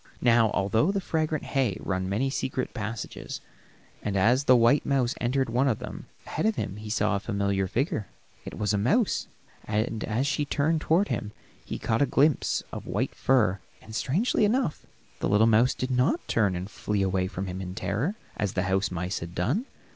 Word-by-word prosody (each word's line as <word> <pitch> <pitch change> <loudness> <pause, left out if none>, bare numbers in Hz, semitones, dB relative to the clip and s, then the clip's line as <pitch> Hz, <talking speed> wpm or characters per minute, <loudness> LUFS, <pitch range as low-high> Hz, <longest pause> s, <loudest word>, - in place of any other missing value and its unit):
Now 115 -2 +5
all 100 -2 0
through 115 - +2
the 200 - +1
fragrant 160 -4 -1
hay 130 -9 0
run 95 0 -2
many 125 +7 0
secret 130 -1 -2
passages, 110 -1 -5 0.6
and 100 -2 -1
as 120 +8 +3
the 130 - +7
white 120 +4 +4
mouse 130 -3 +1
entered 130 +2 +1
one 125 +4 +2
of 115 -6 +2
them, - - -8 0.2
ahead - - -1
of 220 - +1
him 100 - -3
he 105 0 -8
saw 105 -1 +1
a - - 0
familiar 100 -2 0
figure; 135 - -1 0.4
it - - -8
was 105 -1 0
a 100 - +1
mouse, 205 - +1 0.4
and 110 +1 -1
as 115 +5 0
she 150 +1 0
turned 150 +2 +1
toward 175 +7 +2
him, 105 -3 -3 0.3
he - - -5
caught 115 +1 0
a 140 - +4
glimpse 145 +3 +2
of - - -7
white - - -1
fur, 110 -8 +2 0.2
and, 110 - -13
strangely 190 - +1
enough, 215 - 0 0.3
the - - 0
little 105 +3 +5
mouse 115 +3 +4
did 130 0 -3
not 125 - +1
turn 105 -5 +2
and 90 +3 -5
flee 105 -1 -1
away 95 -1 +1
from 95 +1 -4
him 95 0 -5
in 90 0 -6
terror, 105 - -1 0.2
as 105 -3 -1
the 90 - 0
house 95 +1 +1
mice 90 +2 -3
had 85 +1 -8
done. 140 - 0
115 Hz, 200 wpm, -27 LUFS, 100-140 Hz, 0.6 s, the